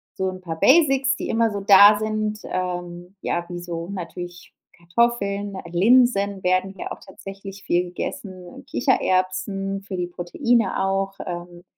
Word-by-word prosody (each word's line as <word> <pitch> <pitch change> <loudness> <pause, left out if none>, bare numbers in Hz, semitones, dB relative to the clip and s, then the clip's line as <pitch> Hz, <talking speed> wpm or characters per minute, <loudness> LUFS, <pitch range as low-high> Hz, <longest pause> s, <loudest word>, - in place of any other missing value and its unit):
so 190 0 -1
'n 185 0 -7
paar 165 -3 -5
Basics, 270 - +4
die - - -4
immer 225 0 +2
so 205 - -3
da 200 +1 +8
sind, 215 0 -2
ähm, 180 0 -5
ja, 175 0 -2
wie 175 0 -5
so 170 0 -6
natürlich 175 -1 -8 0.2
Kartoffeln. 200 +2 0
Äh, 180 -2 -8
Linsen 200 0 +3
werden 185 +1 +1
hier - - -7
auch - - -6
tatsächlich 195 0 -10
viel 175 +1 +1
gegessen. 180 0 -7
Kichererbsen 185 - 0
für 195 -1 -6
die 180 -1 -2
Proteine 190 +5 0
auch, 195 0 -1
ähm 175 0 -7
190 Hz, 150 wpm, -23 LUFS, 175-205 Hz, 0.2 s, da